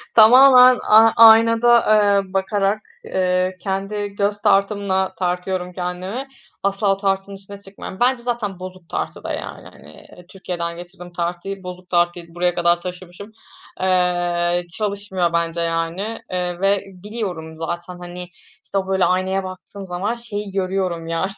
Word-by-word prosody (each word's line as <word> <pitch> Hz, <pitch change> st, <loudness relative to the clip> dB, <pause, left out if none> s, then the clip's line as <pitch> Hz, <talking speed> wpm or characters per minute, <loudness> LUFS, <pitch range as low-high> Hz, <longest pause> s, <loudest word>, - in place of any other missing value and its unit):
Tamamen, 250 Hz, +2 st, +8 dB
a 220 Hz, +1 st, +7 dB
aynada, 230 Hz, +1 st, +7 dB, 0.5 s
eee, 185 Hz, -, -17 dB
bakarak, 195 Hz, +2 st, 0 dB, 0.2 s
eee, 185 Hz, 0 st, 0 dB
kendi 195 Hz, +2 st, -3 dB
göz 205 Hz, +1 st, -2 dB
tartımla 195 Hz, -2 st, +1 dB
tartıyorum 180 Hz, 0 st, -2 dB
kendimi. 185 Hz, +8 st, -5 dB, 0.4 s
Asla 195 Hz, 0 st, +1 dB
tartının 195 Hz, 0 st, -2 dB
üstüne 200 Hz, +1 st, -12 dB
çıkmıyorum. 195 Hz, -1 st, -10 dB
Bence 245 Hz, 0 st, +2 dB
zaten 225 Hz, -6 st, -3 dB
bozuk 185 Hz, -2 st, -10 dB
tartı -, -, -4 dB
da, -, -, -4 dB
yani, -, -, -7 dB
hani, 75 Hz, -, -16 dB
eee, 180 Hz, -, -16 dB
Türkiye’den 170 Hz, -3 st, -5 dB
getirdiğim 175 Hz, 0 st, -11 dB
tartıyı, 175 Hz, +3 st, -4 dB
bozuk 180 Hz, 0 st, -9 dB
tartıyı 175 Hz, -1 st, -1 dB
buraya 175 Hz, 0 st, 0 dB
kadar 175 Hz, 0 st, +2 dB
taşımışım. 180 Hz, +3 st, -9 dB, 0.5 s
Eee, 175 Hz, -1 st, +1 dB
çalışmıyor 200 Hz, -4 st, -2 dB
bence, 170 Hz, 0 st, 0 dB
yani, 165 Hz, +6 st, -2 dB
eee, 180 Hz, -1 st, -2 dB
ve 195 Hz, 0 st, +2 dB
biliyorum 185 Hz, -5 st, -6 dB
zaten, 175 Hz, +2 st, -5 dB
hani, 180 Hz, 0 st, -8 dB, 0.4 s
işte, 195 Hz, -, -4 dB
o 190 Hz, -1 st, -1 dB
böyle 190 Hz, -1 st, +2 dB
aynaya 190 Hz, +1 st, 0 dB
baktığım 190 Hz, +1 st, -9 dB
zaman 185 Hz, +6 st, -2 dB
şeyi 210 Hz, -4 st, -6 dB
görüyorum, 185 Hz, -3 st, -2 dB
yani, 165 Hz, +4 st, -2 dB
190 Hz, 140 wpm, -20 LUFS, 175-200 Hz, 0.5 s, Tamamen